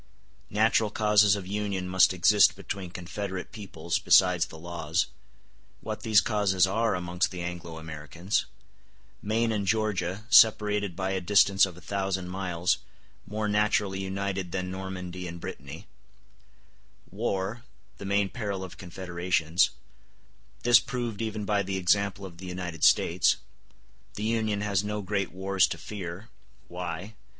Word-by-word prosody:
—Natural 110 +1 +2
causes 105 -1 +4
of 100 -2 -6
union 100 -1 -2
must 95 +1 +5
exist 95 +3 +5
between 95 -1 -6
confederate 95 +1 -5
peoples 95 -5 -3
besides 90 -2 +4
the 80 - -11
laws—What 85 +1 -5
these 110 -2 +5
causes 100 -4 +2
are 110 +3 +1
amongst 90 +1 -1
the 90 -2 -6
Anglo 85 -2 -6
Americans—Maine 85 +7 -4
and 100 -3 -2
Georgia, 105 -2 -1
separated 105 -5 +5
by 95 +1 -2
a 95 -1 -1
distance 100 +1 +5
of 90 -2 -11
a - - -12
thousand 95 0 -2
miles, 90 -2 -1 0.5
more 105 +1 -2
naturally 105 -2 +1
united 95 -1 -3
than 90 0 -3
Normandy 90 -1 -6
and 85 0 -7
Brittany—War, 95 - -8 0.4
the - - -7
main 100 0 +2
peril 100 -5 -4
of 95 - -10
confederations—This 90 +5 -1
proved 120 -4 -4
even 110 -2 -3
by 100 0 +1
the 95 0 -3
example 100 +2 +1
of 85 -3 -11
the 95 - -8
United 90 -3 -5
States—The 90 +3 0
Union 110 -2 0
has 100 -1 0
no 105 0 -3
great 100 -1 -1
wars 95 0 +2
to - - -5
fear—Why? 90 0 -8
95 Hz, 125 wpm, -28 LUFS, 90-105 Hz, 0.5 s, must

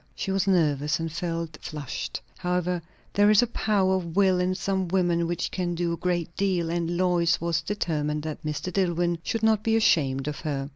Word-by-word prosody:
She 195 - -3
was 195 0 +1
nervous, 150 -5 +2
and 165 0 -3
felt 165 -1 -4
flushed. 150 -4 -5 0.2
However, 180 -1 -1 0.3
there 205 +1 +5
is 215 +2 +6
a 240 - -4
power 195 -3 +2
of 170 -3 -6
will 190 -2 +4
in 180 +1 +1
some 190 -1 -1
women 170 -2 +1
which 175 0 -2
can 175 -2 -2
do 170 0 -1
a - - -3
great 175 -2 -2
deal, 180 -4 0
and 170 0 -1
Lois 175 -2 +2
was 170 0 0
determined 150 -5 -2
that 155 0 -5
Mr. 155 +4 -3
Dillwyn 175 -2 +1
should 225 +5 -3
not 220 -2 +4
be 225 0 +1
ashamed 140 -11 +2
of 150 - -3
her. 140 -3 -3
175 Hz, 195 wpm, -26 LUFS, 165-190 Hz, 0.3 s, is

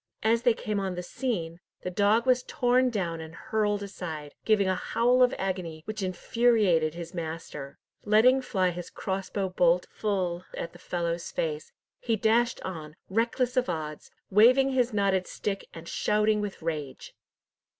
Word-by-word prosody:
As 225 +2 +3
they 240 -2 +3
came 210 -1 -2
on 190 -2 -2
the 180 - -4
scene, 175 -7 -3 0.2
the 180 - -3
dog 205 +5 +3
was 255 -1 +4
torn 250 +1 +2
down 175 -8 -2
and 160 0 -9
hurled 210 -1 -1
aside, 160 -7 -6
giving 210 -3 +3
a 190 - +2
howl 245 +7 +2
of 250 0 +6
agony, 180 -5 -3
which 215 0 -5
infuriated 185 -4 +2
his 170 +1 -7
master. 160 -4 -6 0.3
Letting 230 +5 +5
fly 190 -8 +1
his 175 0 -7
crossbow 195 0 -3
bolt 180 -1 +3
full 185 -4 -1
at 170 - -5
the 175 - -14
fellow's 170 -1 -3
face, 155 -1 -3 0.3
he 230 - 0
dashed 230 +3 +2
on, 155 -5 -6 0.2
reckless 240 +4 +1
of 250 -6 +1
odds, 155 -3 -4 0.2
waving 255 +7 +6
his 250 -2 +2
knotted 195 -3 +1
stick, 200 -1 -4
and 165 0 -10
shouting 210 +2 +1
with 200 -5 -5
rage. 150 -5 -4
195 Hz, 160 wpm, -28 LUFS, 170-225 Hz, 0.3 s, of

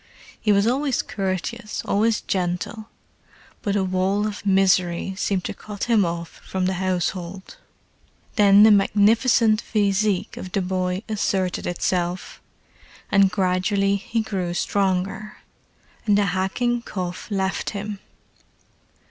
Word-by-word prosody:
He 210 - +2
was 200 0 +4
always 265 +2 +1
courteous, 200 +4 -4
always 215 +2 +1
gentle; 195 +4 -3 0.7
but 205 -3 -1
a 200 - +2
wall 190 +2 0
of 210 -1 -5
misery 190 -2 +2
seemed 190 -1 -1
to - - -4
cut 205 -2 -8
him 230 -4 +3
off 170 -1 -5
from 190 -1 -2
the 190 - +1
household. 185 0 -3 0.8
Then 205 -1 +7
the 220 - +8
magnificent 215 +2 +4
physique 205 -2 0
of 185 - -8
the 195 - +1
boy 185 +1 -2
asserted 195 -4 -1
itself, 175 +1 -2 0.7
and 195 -1 +5
gradually 190 +2 +1
he 225 +3 -2
grew 185 -5 -3
stronger, 195 +2 -1 0.7
and 205 -1 +4
the 205 - +3
hacking 235 +6 0
cough 180 -5 -5
left 195 -2 -1
him. 205 -1 -5
195 Hz, 120 wpm, -23 LUFS, 185-210 Hz, 0.8 s, the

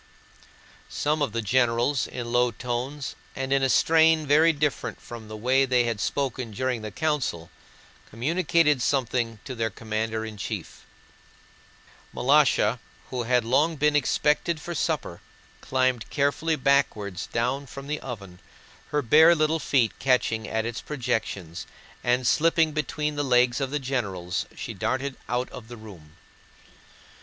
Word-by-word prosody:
Some 150 +1 -1
of 140 - 0
the 115 +1 -2
generals, 120 +4 +2
in 120 -2 -6
low 120 0 +3
tones 125 +4 -4 0.2
and 135 0 -2
in 135 - +3
a 135 - +2
strain 160 +3 +4
very 155 +3 +5
different 150 -3 -2
from 115 -2 -10
the 110 0 -7
way 130 +5 +3
they 125 -2 +3
had 115 -3 -2
spoken 130 +1 -2
during 125 +2 -2
the 110 - -5
council, 125 - -2 0.6
communicated 150 +3 +2
something 120 -4 0
to 130 - -5
their 115 -2 -1
commander 110 0 -3
in 110 -1 -8
chief. 105 - -6 1.3
Malásha, 130 -4 +3 0.3
who 125 -1 -2
had 125 -1 +2
long 145 +7 +2
been 150 0 +2
expected 150 +3 +1
for 175 +3 -6
supper, 155 - -2 0.4
climbed 130 -2 0
carefully 145 +3 0
backwards 125 - 0
down 130 +4 -1
from 135 +2 -9
the 150 +1 -3
oven, 100 -8 -8 0.5
her 150 -1 -1
bare 160 +8 +6
little 155 +1 +1
feet 130 -6 +2
catching 120 -4 +1
at 110 0 -1
its 120 0 -4
projections, 100 - -3 0.4
and 125 +1 +1
slipping 160 +3 +3
between 150 0 -2
the 145 - 0
legs 125 0 +3
of 135 - -1
the 145 - -1
generals 105 -11 -3
she - - -6
darted 130 +7 -2
out 125 +1 0
of 110 - -10
the 120 0 -9
room. 90 -8 -13
130 Hz, 145 wpm, -26 LUFS, 115-145 Hz, 1.3 s, bare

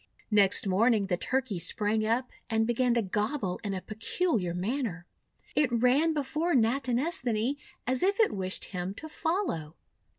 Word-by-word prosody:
Next 200 -1 +4
morning 210 +2 +3
the 190 -2 0
Turkey 255 -4 -1
sprang 215 +5 0
up 235 +4 0 0.2
and 225 -1 +2
began 240 +1 +1
to 235 - +2
gobble 205 0 -2
in 200 -2 -2
a 185 - -4
peculiar 220 - -1
manner. 195 -2 -2 0.5
It 290 -4 +2
ran 255 +7 +3
before 305 +4 0
Natinesthani 250 - +1 0.3
as 255 +1 0
if 395 +2 +2
it 445 - +4
wished 190 -1 0
him 180 +2 -3
to 315 - -5
follow. 315 - -2
230 Hz, 145 wpm, -29 LUFS, 200-275 Hz, 0.5 s, Next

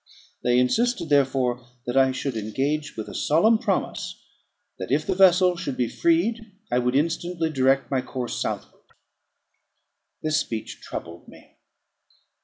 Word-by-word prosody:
They 125 0 +2
insisted, 175 - +1
therefore, 130 -3 +2 0.2
that 120 - -3
I 135 -1 +5
should 130 0 -3
engage 135 +8 -2
with 110 - -5
a - - -8
solemn 215 +9 +3
promise, 200 -5 -2 0.6
that 95 - -5
if 150 +3 +2
the - - 0
vessel 180 -1 +5
should 170 -7 -4
be 125 - +1
freed 235 - 0 0.2
I 125 - +3
would 125 +1 0
instantly 165 +2 0
direct 135 -1 +2
my 130 -2 +1
course 125 -1 -4
southward. - - -4 1.4
This 155 0 +2
speech 115 -7 -5
troubled 85 +1 -8
me. - - -17
140 Hz, 140 wpm, -24 LUFS, 125-180 Hz, 1.4 s, I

